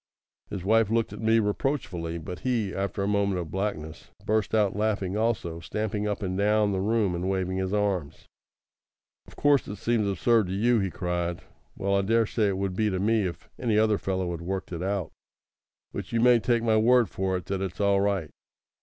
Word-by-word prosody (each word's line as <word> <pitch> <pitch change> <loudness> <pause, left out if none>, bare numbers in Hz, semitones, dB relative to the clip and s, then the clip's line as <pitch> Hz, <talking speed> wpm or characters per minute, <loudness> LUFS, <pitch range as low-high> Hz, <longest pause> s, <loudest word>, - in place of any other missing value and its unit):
His 95 -3 -5
wife 110 0 +4
looked 115 0 0
at - - -8
me 110 +1 +3
reproachfully; 105 - -1
but 85 +3 -7
he, 115 -7 -1
after 100 0 -2
a - - 0
moment 100 -2 +1
of 80 -3 -6
blackness, 95 -5 -4 0.2
burst 110 0 +1
out 105 -3 +2
laughing 100 -3 -1
also, 105 -7 -1
stamping 105 +4 -3
up 105 0 -2
and 95 -1 -2
down 105 +1 +2
the 95 - -1
room 105 -2 +1
and 90 +2 -2
waving 95 -1 -1
his 95 0 -1
arms. 100 -8 -1 1.0
"Of - - -15
course 145 -2 +3
it 105 - -5
seems 115 -1 0
absurd 105 +2 +2
to 90 - -3
you," 115 +4 +3
he 95 -1 0
cried. 85 -1 -3 0.3
"Well, 100 0 -1
I 100 - +3
daresay 110 +1 +2
it 95 -1 -1
would 95 -1 -2
to 105 -2 0
me 105 0 +2
if 85 - -8
any 115 -4 +1
other 110 -1 +3
fellow 95 -2 -2
had 85 -1 -5
worked 95 +2 -4
it 85 -1 -4
out. 95 -2 -2 0.8
But - - -6
you 115 - +1
may 120 0 +6
take 120 0 +1
my 110 -2 +3
word 120 +1 +4
for 95 0 -1
it 90 - -8
that 95 -1 -3
it's 95 -1 -4
all 100 -1 +3
right. 95 -7 0
100 Hz, 200 wpm, -27 LUFS, 95-110 Hz, 1.0 s, may